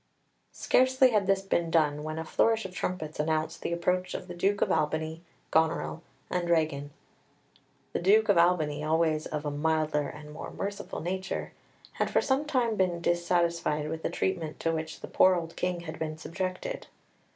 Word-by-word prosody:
Scarcely 260 0 +4
had 205 -3 +2
this 195 0 +2
been 170 -3 0
done 150 -3 +2
when 155 +1 -4
a 160 - -3
flourish 225 +5 +2
of 185 - -7
trumpets 160 -5 -4
announced 155 +1 -1
the - - -3
approach 180 +2 0
of 180 - -6
the 175 - -6
Duke 195 +4 +1
of - - 0
Albany, 160 +1 0 0.3
Goneril, 160 +1 +1 0.3
and 175 -1 -2
Regan. 155 -4 +1 1.0
The - - 0
Duke 210 +5 +5
of 200 - +5
Albany, 160 -4 +3
always 155 0 +1
of 150 -1 -4
a 145 - -1
milder 155 -1 0
and 150 0 -10
more 155 - -7
merciful 200 0 -5
nature, 185 +3 -3 0.4
had - - -1
for - - +3
some 275 +2 +1
time 245 -7 +1
been 180 -2 +1
dissatisfied 170 -3 +1
with 160 0 -4
the - - -1
treatment 170 -5 -2
to 165 - +1
which 160 0 -4
the - - -6
poor 185 0 +5
old 165 -1 -4
King 180 -1 -1
had 160 -1 -7
been 155 -1 -3
subjected. 185 - -4
170 Hz, 175 wpm, -29 LUFS, 155-185 Hz, 1.0 s, Duke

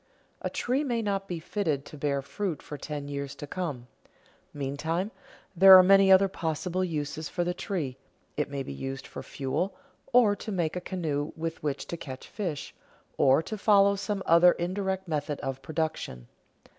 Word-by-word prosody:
A - - -2
tree 260 +4 0
may 240 -5 -1
not 195 -1 -1
be 175 -2 -4
fitted 155 -5 -2
to - - -11
bear 140 -1 -1
fruit 170 +3 -4
for 150 - -7
ten 145 0 -5
years 140 -1 -5
to - - -7
come. 145 -7 -4 0.7
Meantime, 160 +8 -2 0.4
there 190 +2 +10
are 185 - +8
many 195 +1 +6
other 190 +1 +7
possible 180 +1 -2
uses 155 -2 -3
for 175 - -1
the 175 +1 -1
tree: 165 - -3 0.4
it 150 0 -1
may 140 -1 -3
be 70 - -6
used 135 - -5
for - - -8
fuel, 145 +8 -3 0.4
or 235 -4 +5
to 215 - -7
make 170 -4 -1
a 180 - -3
canoe 155 -6 -3
with 165 0 -4
which 145 -2 -2
to 170 - -5
catch 130 -5 -8
fish, 175 -9 -4 0.5
or 135 +3 +5
to 215 +5 -6
follow 200 -1 +5
some 200 0 -3
other 170 +1 +7
indirect 190 +1 -2
method 150 -2 -2
of 135 0 -4
production. 155 - -3
165 Hz, 175 wpm, -28 LUFS, 145-190 Hz, 0.7 s, there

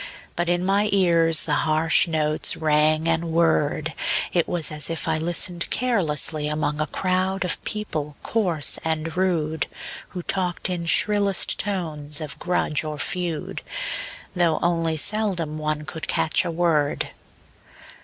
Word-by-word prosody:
But 175 0 -1
in 175 +1 +1
my 200 +2 +2
ears 170 -4 +3
the 150 - -1
harsh 155 +2 +3
notes 155 -2 0
rang 155 +1 +2
and 165 0 +1
whirred; 155 -2 +1 0.4
It 170 -2 +2
was 170 -3 +1
as 150 +1 -1
if 165 0 -3
I 160 -1 +1
listened 175 +1 -1
carelessly 160 -10 +1
Among 150 0 -1
a 155 - 0
crowd 185 +2 0
of 180 - -1
people 155 -9 -3
coarse 180 -10 0
and 160 0 -2
rude, 165 -4 0 0.4
Who 180 -1 -6
talked 185 -1 -1
in 170 -2 -3
shrillest 205 +1 +4
tones 155 -7 -1
of 155 -2 -6
grudge 175 -4 0
or 155 -1 -4
feud, 170 0 -2 0.7
Though 170 -3 +2
only 165 -2 +1
seldom 175 -5 0
one 155 0 -2
could 160 +1 -6
catch 160 - +1
a - - -1
word. 160 -4 0
165 Hz, 140 wpm, -23 LUFS, 155-180 Hz, 0.7 s, shrillest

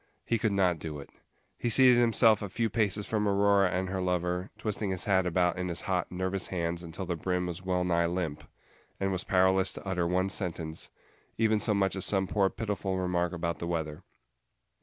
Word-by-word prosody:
He 115 - 0
could 110 -1 +1
not 90 -4 +2
do 75 -2 -6
it. 70 - -11 0.5
He 120 - 0
seated 125 +1 +6
himself 115 -2 +4
a 100 - -4
few 115 +3 -1
paces 105 -2 0
from 105 -2 0
Aurora 100 -1 +3
and 95 +1 -1
her 95 0 -2
lover, 90 +1 -1
twisting 105 -1 -2
his 95 -1 -2
hat 95 -3 +2
about 90 0 +1
in 90 0 -2
his 85 +1 -3
hot, 90 -3 -1
nervous 95 +1 -2
hands 85 -1 -2
until 85 +2 -6
the 90 -1 -2
brim 90 +2 -1
was 90 0 -5
wellnigh 90 -2 +1
limp, 85 -4 -3 0.6
and 95 0 0
was 95 -1 -2
powerless 95 0 +3
to - - -8
utter 90 -2 0
one 90 +2 +1
sentence, 85 -4 -3 0.5
even 110 -1 +2
so 105 0 0
much 95 -1 +1
as 95 - -3
some 95 -2 +2
poor 100 0 +1
pitiful 100 -3 -3
remark 90 -1 0
about 85 -1 -3
the 85 - -4
weather. 80 -3 -3
95 Hz, 200 wpm, -29 LUFS, 90-100 Hz, 0.6 s, seated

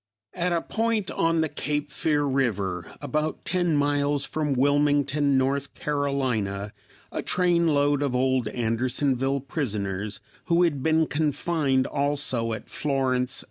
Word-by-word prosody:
At 180 0 -1
a 170 -1 0
point 225 -3 -1
on 165 0 +1
the 160 - +1
Cape 145 0 -3
Fear 150 -1 +1
river, 105 - -1
about 150 +2 -2
ten 175 -3 +1
miles 145 0 +1
from 150 -2 -1
Wilmington, 145 0 +2
N. 135 +2 +2
C., 130 -9 -2 0.4
a - - -3
trainload 160 -5 +2
of 140 -3 0
old 130 -2 +1
Andersonville 130 +4 0
prisoners 105 - -3 0.3
who 170 0 +3
had 150 -6 +1
been 160 +2 +3
confined 145 -3 0
also 140 -5 -1
at 110 - -7
Florence, 130 -3 0
S. - - 0
140 Hz, 130 wpm, -26 LUFS, 130-150 Hz, 0.4 s, who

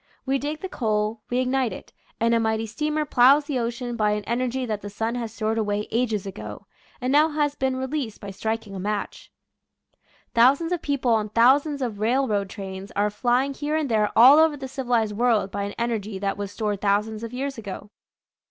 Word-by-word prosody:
We 270 0 +1
dig 300 +3 -4
the 380 - -3
coal, 215 - -1
we 245 - 0
ignite 255 -1 +1
it, 185 - -10 0.3
and 230 +1 +2
a 230 - +4
mighty 220 0 0
steamer 300 +7 -2
plows 275 +2 +5
the 285 -4 -1
ocean 240 +1 -3
by 210 -2 +2
an 210 0 -2
energy 250 +3 -1
that 215 -3 -3
the 205 - -6
sun 225 +3 -2
has 235 -3 -4
stored 220 +1 -1
away 210 -1 -1
ages 225 -4 0
ago, 195 +1 -8 0.3
and 255 0 -1
now 300 +3 +5
has 295 -1 0
been 265 -2 -1
released 260 -3 -3
by 200 - -7
striking 220 +1 -3
a 195 - -5
match. 205 +2 -4 1.0
Thousands 275 +8 +4
of 355 - -1
people 275 -4 0
on 215 -2 +1
thousands 270 +6 +3
of 220 -5 -4
railroad 215 -3 +1
trains 195 -1 -7
are 205 +1 +1
flying 250 +5 +1
here 295 +2 -2
and 310 -3 0
there 210 -2 +2
all 260 +6 +9
over 320 -2 +4
the 265 -1 -6
civilized 240 -5 -1
world 220 -4 +2
by 200 - -2
an 200 - -6
energy 220 -4 -2
that 195 0 -2
was 205 -1 -5
stored 210 -2 -2
thousands 210 +2 0
of 230 - -5
years 270 0 -4
ago. 205 -1 -8
230 Hz, 200 wpm, -24 LUFS, 210-265 Hz, 1.0 s, all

